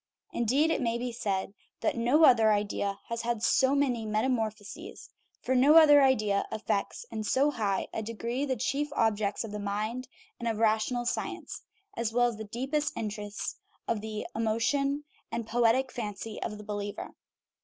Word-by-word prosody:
Indeed, 270 +8 +2
it - - 0
may 235 -1 0
be 245 +1 -3
said 195 -4 -2 0.3
that - - +1
no 245 +7 +3
other 225 -5 +6
idea 200 -1 -1
has 230 0 -2
had 235 -1 -2
so 265 +3 +3
many 255 -5 +1
metamorphoses; 220 - -3 0.3
for 260 - 0
no 270 +5 +6
other 295 -3 +8
belief 215 -7 +3
affects 215 - -2
in 215 - -3
so 270 +7 +2
high 205 -7 -1
a - - -2
degree 230 +4 -3
the 265 -2 0
chief 275 +5 -1
objects 210 -2 +1
of 225 - -7
the 210 - -4
mind 215 +5 -3 0.3
and 235 - -3
of 225 -2 0
rational 220 +2 +1
science, 240 - -3 0.3
as 230 -1 -1
well 245 +1 +3
as 230 - -7
the 220 - -5
deepest 270 +8 -2
interests 210 -1 -4 0.3
of 225 -3 -1
the 215 -1 -5
emotion 230 +6 0 0.3
and 235 -1 -3
poetic 240 +3 +2
fancy 210 -2 -5
of 210 - -4
the 210 - -10
believer. 205 -1 -5
230 Hz, 165 wpm, -29 LUFS, 210-260 Hz, 0.3 s, other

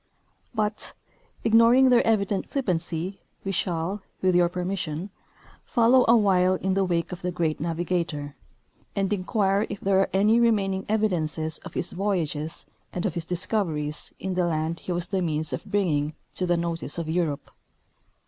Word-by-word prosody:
But, 210 -1 -1 0.5
ignoring 230 +4 +6
their 245 - +6
evident 200 -3 +1
flij^pancy, 180 - -2 0.2
we 195 - -2
shall, 180 +2 -1 0.2
with 185 -1 +2
your 175 -1 +4
per 180 0 -3
mission, 180 -1 -3 0.5
follow 250 -1 +4
awhile 190 -5 +4
in 190 +1 -1
the 195 0 +2
wake 170 -2 -1
of 180 - -6
the 180 - -1
great 165 -3 -1
navigator, 165 -3 -2 0.6
and 195 +1 +1
inquire 200 +1 +1
if 205 - -5
there 195 -1 +2
are 195 - +2
any 210 +4 +4
remaining 195 -5 +2
evidences 160 -7 0
of - - -11
his - - +1
voyages 170 -5 -2 0.3
and 180 - -3
of 190 - 0
his 170 -1 -4
discoveries 165 -5 -2
in 190 -1 -3
the 180 -1 +1
land 160 0 -1
he - - -5
was 175 +1 -2
the 195 -2 0
means 155 -2 -1
of - - -4
bringing 155 -7 0 0.2
to 180 - -1
the 175 0 +2
notice 170 -2 -3
of 165 -2 -3
Europe. 160 -3 -1
180 Hz, 160 wpm, -26 LUFS, 165-200 Hz, 0.6 s, ignoring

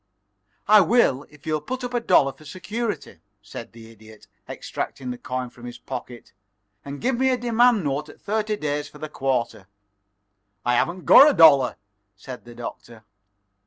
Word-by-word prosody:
"I 210 0 +7
will 175 - +2
if 150 -1 -20
you'll 155 -1 -1
put 255 - -6
up 245 0 -5
a 240 - +1
dollar 140 -11 +3
for 135 - -19
security," 190 - -5 0.2
said 105 +3 -9
the 115 -1 -14
Idiot, 110 -1 -17 0.2
extracting 130 -2 -6
the 125 - -6
coin 125 -1 -5
from 120 - -14
his 120 - -8
pocket, 120 -2 -9 0.5
"and 140 0 -8
give 250 0 0
me 265 0 +3
a 255 - +1
demand 240 -2 +2
note 145 +1 -3
at - - -15
thirty 215 +1 -2
days 145 -5 -3
for 150 - -15
the 155 +1 -7
quarter." 125 -9 -2 1.0
"I 120 - +2
haven't 170 +9 -1
got 285 - +9
a 290 - 0
dollar," 140 -6 +6 0.4
said 125 +6 -10
the 120 0 -13
Doctor. 115 -1 -9
145 Hz, 170 wpm, -23 LUFS, -, 1.0 s, got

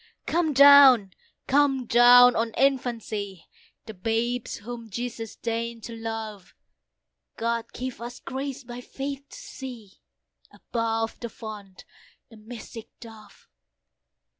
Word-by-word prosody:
Come 330 -2 0
down! 275 -7 +8 0.3
come 270 -2 +2
down! 245 +1 +7
on 225 0 -1
infancy, 225 -8 -1 0.4
The 220 - -8
babes 225 +5 -2
whom 235 +1 -9
Jesus 230 0 -6
deign'd 230 0 -4
to 230 - -7
love; 225 -4 -7 0.8
God 230 0 -2
give 255 -1 -6
us 240 +1 -7
grace 275 +1 -6
by 240 0 -9
faith 275 +2 -6
to - - -12
see, 240 -7 -10 0.5
Above 225 -1 -3
the 235 - -6
Font, 210 -4 -10 0.5
the 225 - -14
mystic 225 +1 -10
Dove. 220 -2 -15
235 Hz, 115 wpm, -25 LUFS, 225-255 Hz, 0.8 s, down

